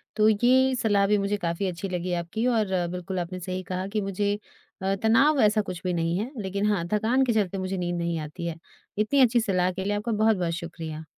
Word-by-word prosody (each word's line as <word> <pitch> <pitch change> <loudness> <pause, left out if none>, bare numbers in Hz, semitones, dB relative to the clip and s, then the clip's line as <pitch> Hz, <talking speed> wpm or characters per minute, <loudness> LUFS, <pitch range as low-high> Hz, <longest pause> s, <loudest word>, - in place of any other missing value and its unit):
तो 215 -1 +4
ये 255 +5 +4
सलाह 205 -4 +2
भी 210 - +3
मुझे 200 +1 0
काफ़ी 170 +1 -2
अच्छी 180 +2 -4
लगी 180 0 -2
आपकी 175 +7 -2
और 225 -3 +2 0.3
बिल्कुल 180 +1 -4
आपने 185 +1 -4
सही 185 +1 -4
कहा 185 +1 -4
कि 215 +1 -2
मुझे 200 +1 -1 0.5
अ, 195 +1 +1
तनाव 270 +7 +4
ऐसा 215 0 +4
कुछ 185 -3 -6
भी 180 - -1
नहीं 165 0 0
है, 240 +6 -3
लेकिन 200 +1 -2
हाँ, 180 -5 0
थकान 230 +5 +2
के 235 - +1
चलते 200 -3 0
मुझे 185 0 -3
नींद 175 -1 -2
नहीं 170 -1 -1
आती 155 +3 -6
है। 165 - -3 0.4
इतनी 215 +7 +2
अच्छी 245 -1 +5
सलाह 185 -3 +1
के 190 +1 -4
लिए 205 +1 0
आपका 220 +3 -2
बहुत-बहुत 210 -6 +2
शुक्रिया। 165 -2 -6
195 Hz, 220 wpm, -26 LUFS, 180-215 Hz, 0.5 s, अच्छी